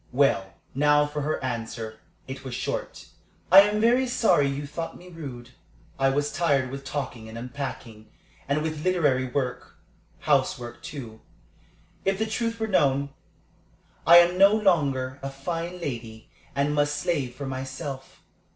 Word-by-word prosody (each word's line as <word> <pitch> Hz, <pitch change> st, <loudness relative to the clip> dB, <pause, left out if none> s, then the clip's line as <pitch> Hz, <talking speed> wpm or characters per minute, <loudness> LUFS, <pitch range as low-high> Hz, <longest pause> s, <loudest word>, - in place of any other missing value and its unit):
Well, 120 Hz, -9 st, +2 dB, 0.2 s
now 150 Hz, +1 st, +4 dB
for 145 Hz, 0 st, -4 dB
her 150 Hz, +2 st, -1 dB
answer. 115 Hz, -2 st, -4 dB, 0.3 s
It 130 Hz, 0 st, -7 dB
was 130 Hz, -2 st, -5 dB
short. 130 Hz, -, -4 dB, 0.4 s
"I 190 Hz, -, +11 dB
am 210 Hz, +1 st, +1 dB
very 245 Hz, +4 st, +3 dB
sorry 180 Hz, -, +3 dB
you 140 Hz, +1 st, -3 dB
thought 165 Hz, +3 st, -6 dB
me 180 Hz, +1 st, -14 dB
rude. 130 Hz, -8 st, -9 dB, 0.5 s
I 135 Hz, 0 st, +4 dB
was 145 Hz, +2 st, 0 dB
tired 140 Hz, -7 st, +1 dB
with 135 Hz, 0 st, -6 dB
talking 130 Hz, -5 st, -5 dB
and 110 Hz, -, -8 dB
unpacking, 120 Hz, -4 st, -7 dB, 0.4 s
and 150 Hz, +2 st, +1 dB
with 155 Hz, -1 st, -3 dB
literary 145 Hz, -8 st, +2 dB
work 125 Hz, 0 st, -3 dB, 0.5 s
housework, 120 Hz, -1 st, 0 dB
too, 115 Hz, -7 st, -8 dB, 0.8 s
if 195 Hz, 0 st, +1 dB
the 220 Hz, -, 0 dB
truth 230 Hz, +1 st, -2 dB
were 220 Hz, -, 0 dB
known. 140 Hz, -8 st, +2 dB, 1.0 s
I 170 Hz, +1 st, +10 dB
am 175 Hz, +1 st, +5 dB
no 200 Hz, +2 st, +7 dB
longer 140 Hz, -10 st, +1 dB
a 135 Hz, -, -4 dB
fine 165 Hz, +6 st, -4 dB
lady, 115 Hz, -7 st, -6 dB, 0.2 s
and 140 Hz, +1 st, +1 dB
must 145 Hz, 0 st, +1 dB
slave 140 Hz, -7 st, -1 dB
for 140 Hz, -, -6 dB
myself. 135 Hz, +1 st, -6 dB
140 Hz, 150 wpm, -26 LUFS, 130-170 Hz, 1.0 s, I